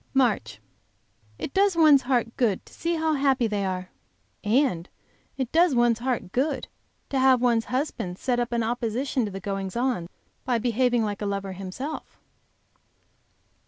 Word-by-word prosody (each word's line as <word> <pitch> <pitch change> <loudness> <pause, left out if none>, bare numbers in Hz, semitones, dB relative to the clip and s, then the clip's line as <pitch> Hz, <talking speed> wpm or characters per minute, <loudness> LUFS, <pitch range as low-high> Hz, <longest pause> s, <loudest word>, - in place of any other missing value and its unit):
MARCH. 225 - +1 0.8
It 275 - -5
does 395 -1 +3
one's 305 -4 +6
heart 245 -3 0
good 220 -7 0
to - - -17
see 335 +1 -1
how 320 -1 +1
happy 270 -3 +2
they 210 -2 -1
are! 185 0 -4 0.5
And 210 - +1 0.5
it 260 -3 -2
does 330 -3 +4
one's 240 -1 +3
heart 240 -7 -2
good 270 +8 -1 0.4
to 270 - 0
have 260 -1 +5
one's 235 -2 +2
husband 250 - -3
set 245 +1 0
up 240 0 -1
an 235 -1 +1
opposition 245 +2 -1
to 205 - -5
the 195 - -6
goings 195 -1 -4
on 240 -9 -1 0.3
by 245 -2 +1
behaving 240 +1 +1
like 205 -1 -3
a 205 - -1
lover 200 -1 -3
himself. 195 - -6
240 Hz, 160 wpm, -26 LUFS, 205-265 Hz, 0.8 s, one's